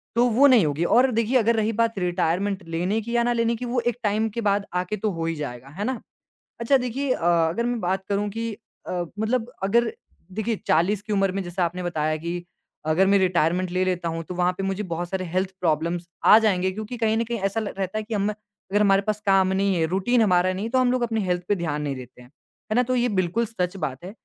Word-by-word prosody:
तो 240 Hz, +1 st, +4 dB
वो 255 Hz, +5 st, +5 dB
नहीं 245 Hz, -, +6 dB
होगी 150 Hz, +2 st, -1 dB
और 250 Hz, +9 st, +4 dB
देखिए 230 Hz, +2 st, +2 dB
अगर 230 Hz, -1 st, +3 dB
रही 220 Hz, 0 st, +1 dB
बात 230 Hz, 0 st, 0 dB
रिटायरमेंट 180 Hz, +2 st, 0 dB
लेने 180 Hz, +6 st, 0 dB
की 235 Hz, +2 st, -4 dB
या 235 Hz, -, +3 dB
ना 240 Hz, 0 st, +1 dB
लेने 230 Hz, 0 st, +1 dB
की, 245 Hz, +2 st, -5 dB
वो 245 Hz, +1 st, 0 dB
एक 240 Hz, -1 st, -1 dB
टाइम 215 Hz, +1 st, +1 dB
के 235 Hz, +2 st, -4 dB
बाद 200 Hz, -1 st, +1 dB
आके 180 Hz, +4 st, -1 dB
तो 210 Hz, +1 st, -1 dB
हो 165 Hz, -2 st, -3 dB
ही 165 Hz, 0 st, -1 dB
जाएगा, 130 Hz, -4 st, -6 dB
है 205 Hz, -, -2 dB
ना? 255 Hz, -1 st, -2 dB, 0.6 s
अच्छा 235 Hz, +4 st, +4 dB
देखिए 255 Hz, +2 st, -1 dB
अ, -, -, -3 dB, 0.3 s
अगर 230 Hz, +9 st, -1 dB
मैं 240 Hz, -1 st, -1 dB
बात 190 Hz, +1 st, -1 dB
करूँ 205 Hz, +1 st, 0 dB
कि 225 Hz, +2 st, -3 dB, 0.4 s
अ, 175 Hz, -1 st, -1 dB, 0.2 s
मतलब 235 Hz, +2 st, -1 dB
अगर 235 Hz, -, +2 dB, 0.4 s
देखिए 220 Hz, +3 st, -1 dB
40 185 Hz, +6 st, +2 dB
की 215 Hz, 0 st, -5 dB
उम्र 195 Hz, -2 st, +2 dB
में 195 Hz, +1 st, -2 dB
जैसा 175 Hz, +1 st, -1 dB
आपने 175 Hz, +2 st, -3 dB
बताया 155 Hz, -3 st, -1 dB
कि 170 Hz, +2 st, -5 dB, 0.4 s
अगर 160 Hz, +5 st, +3 dB
मैं 200 Hz, +1 st, +4 dB
रिटायरमेंट 180 Hz, -1 st, +1 dB
ले 185 Hz, +1 st, +1 dB
लेता 180 Hz, -2 st, -1 dB
हूँ, 165 Hz, 0 st, -3 dB
तो 180 Hz, -, -7 dB
वहाँ 180 Hz, 0 st, +2 dB
पे -, -, -2 dB
मुझे 195 Hz, +1 st, -2 dB
बहुत 175 Hz, +1 st, -4 dB
सारे 190 Hz, -1 st, -2 dB
हेल्थ 185 Hz, +1 st, 0 dB
प्रॉब्लम्स 170 Hz, +1 st, 0 dB, 0.2 s
आ 215 Hz, -, +9 dB
जाएँगे 190 Hz, -4 st, +1 dB
क्योंकि 215 Hz, +4 st, -6 dB
कहीं 220 Hz, -1 st, +1 dB
न 230 Hz, -, +1 dB
कहीं 235 Hz, 0 st, -3 dB
ऐसा 195 Hz, +3 st, 0 dB
ल 215 Hz, -, -4 dB
रहता 190 Hz, +2 st, -2 dB
है 215 Hz, -, -4 dB
कि 220 Hz, +1 st, -5 dB
अम, 205 Hz, 0 st, +1 dB
अगर 210 Hz, -1 st, -5 dB
हमारे 195 Hz, -1 st, +4 dB
पास 210 Hz, 0 st, -2 dB
काम 195 Hz, -1 st, +4 dB
नहीं 195 Hz, 0 st, +1 dB
है, 165 Hz, -1 st, +2 dB
रूटीन 195 Hz, +8 st, +2 dB
हमारा 185 Hz, -3 st, +3 dB
नहीं 190 Hz, +3 st, -4 dB
हैं, 230 Hz, -, -5 dB
तो 260 Hz, -, +3 dB
हम 255 Hz, -1 st, +3 dB
लोग 255 Hz, -1 st, 0 dB
अपनी 225 Hz, -2 st, 0 dB
हेल्थ 180 Hz, -1 st, 0 dB
पर 205 Hz, -, +3 dB
ध्यान 160 Hz, -5 st, -2 dB
नहीं 145 Hz, -2 st, -2 dB
देते 125 Hz, -1 st, -11 dB
हैं, 125 Hz, -, -16 dB, 0.4 s
है -, -, +2 dB
ना? 250 Hz, -, +5 dB
तो 255 Hz, +1 st, -1 dB
ये 245 Hz, 0 st, +2 dB
बिल्कुल 185 Hz, +6 st, +1 dB
सच 185 Hz, -4 st, -3 dB
बात 150 Hz, -4 st, -4 dB
है। 185 Hz, -, -6 dB
195 Hz, 250 wpm, -24 LUFS, 175-225 Hz, 0.6 s, आ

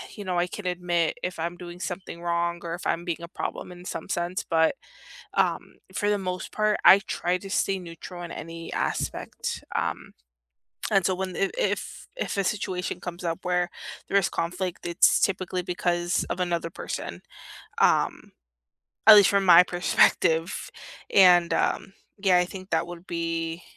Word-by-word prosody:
You 205 Hz, -, -8 dB
know, 180 Hz, -1 st, -1 dB
I 175 Hz, -, +1 dB
can 195 Hz, +1 st, -8 dB
admit 175 Hz, -2 st, 0 dB
if 180 Hz, -1 st, -3 dB
I'm 170 Hz, +2 st, -3 dB
doing 175 Hz, 0 st, -9 dB
something 180 Hz, -2 st, -6 dB
wrong 170 Hz, 0 st, 0 dB
or 170 Hz, -1 st, -4 dB
if 175 Hz, -, -10 dB
I'm 170 Hz, +1 st, -1 dB
being 170 Hz, -1 st, -3 dB
a -, -, -6 dB
problem 180 Hz, -, -5 dB
in 180 Hz, 0 st, -12 dB
some 165 Hz, -3 st, -6 dB
sense, 175 Hz, +2 st, -2 dB
but, 160 Hz, -1 st, +2 dB, 0.6 s
um, -, -, 0 dB, 0.2 s
for 205 Hz, -1 st, 0 dB
the 205 Hz, -, +2 dB
most 185 Hz, -2 st, -4 dB
part, 215 Hz, 0 st, +1 dB
I 195 Hz, -, +10 dB
try 180 Hz, -2 st, -1 dB
to 195 Hz, +1 st, -9 dB
stay 195 Hz, 0 st, +1 dB
neutral 175 Hz, 0 st, -9 dB
in 170 Hz, -, -7 dB
any 165 Hz, 0 st, -7 dB
aspect. -, -, -3 dB
Um, -, -, -2 dB, 0.8 s
and 195 Hz, -3 st, +3 dB
so 190 Hz, -, +2 dB
when, 185 Hz, -1 st, -4 dB
if 195 Hz, -, 0 dB
if -, -, -2 dB
if -, -, -3 dB
a 195 Hz, -, +2 dB
situation 185 Hz, -2 st, -2 dB
comes 175 Hz, 0 st, -7 dB
up 165 Hz, -1 st, -2 dB
where 180 Hz, 0 st, 0 dB, 0.4 s
there 200 Hz, -, +2 dB
is 195 Hz, -, +2 dB
conflict, 180 Hz, +1 st, -3 dB
it's 170 Hz, +3 st, +4 dB
typically 185 Hz, -2 st, 0 dB
because 175 Hz, 0 st, 0 dB
of -, -, -3 dB
another 170 Hz, -2 st, -1 dB
person, -, -, -6 dB, 0.6 s
um, -, -, +2 dB, 0.8 s
at 215 Hz, -, +12 dB
least 205 Hz, -2 st, +7 dB
from 200 Hz, -1 st, +2 dB
my 175 Hz, -1 st, +9 dB
perspective. 170 Hz, -2 st, +2 dB, 0.4 s
And, 180 Hz, -3 st, +6 dB
um, 195 Hz, -, 0 dB, 0.3 s
yeah, 190 Hz, -2 st, +4 dB
I 180 Hz, -, +3 dB
think 185 Hz, +1 st, -10 dB
that -, -, +1 dB
would 175 Hz, 0 st, -9 dB
be 165 Hz, 0 st, -3 dB
180 Hz, 170 wpm, -26 LUFS, 170-185 Hz, 0.8 s, at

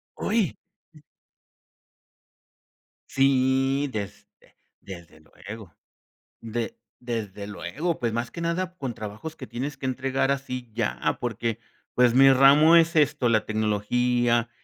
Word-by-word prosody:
¡Hoy! 215 Hz, -4 st, 0 dB, 0.4 s
Eh 155 Hz, -, -17 dB, 2.1 s
Si, 135 Hz, +1 st, +2 dB
desde 100 Hz, -1 st, -6 dB, 0.6 s
desde 85 Hz, -4 st, -11 dB
luego, 100 Hz, +1 st, -11 dB, 0.7 s
de 120 Hz, -, -4 dB, 0.2 s
desde 105 Hz, -5 st, -5 dB
luego. 155 Hz, -, -3 dB
Pues 120 Hz, -2 st, -1 dB
más 120 Hz, +1 st, -3 dB
que 170 Hz, -, -7 dB
nada 180 Hz, +2 st, -2 dB
con 130 Hz, -6 st, -4 dB
trabajos 110 Hz, +9 st, -7 dB
que 130 Hz, -, -9 dB
tienes 135 Hz, +3 st, -5 dB
que 135 Hz, -, -7 dB
entregar 135 Hz, +1 st, 0 dB
así 125 Hz, -4 st, -4 dB
ya, 115 Hz, -2 st, -1 dB
porque, 115 Hz, -1 st, -2 dB, 0.3 s
pues 125 Hz, -1 st, +4 dB
mi 135 Hz, +1 st, +7 dB
ramo 140 Hz, +5 st, +6 dB
es 165 Hz, 0 st, +4 dB
esto, 145 Hz, -5 st, +2 dB
la 110 Hz, -2 st, +2 dB
tecnología, 120 Hz, +3 st, +1 dB
125 Hz, 120 wpm, -25 LUFS, 115-140 Hz, 2.1 s, mi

